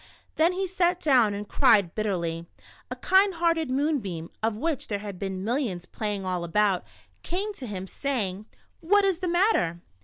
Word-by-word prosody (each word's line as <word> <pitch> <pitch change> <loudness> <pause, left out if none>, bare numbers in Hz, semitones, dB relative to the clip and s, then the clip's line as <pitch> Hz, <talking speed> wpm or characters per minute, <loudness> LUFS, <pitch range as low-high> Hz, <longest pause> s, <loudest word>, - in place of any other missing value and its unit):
Then 330 +3 +3
he 385 +1 -1
sat 360 -1 +1
down 250 - +3
and 205 +1 -6
cried 200 -6 +4
bitterly. 170 -6 -2 0.4
A - - -4
kind 385 0 +3
hearted 330 -3 +1
moonbeam, 255 - -1
of 220 -1 0
which 305 +2 -2
there 205 - -2
had 200 -3 -7
been 190 -1 -4
mil 235 +5 0
lions 190 -11 -3
playing 205 -2 -4
all 180 -2 -2
about, 195 +2 +1 0.4
came 400 +4 -3
to 265 -10 -8
him, 190 -3 -5
saying: 210 -4 -3 0.2
" - - -41
What 410 -1 +6
is 380 -3 +1
the 365 - -2
matter 340 - +2
220 Hz, 180 wpm, -26 LUFS, -, 0.4 s, What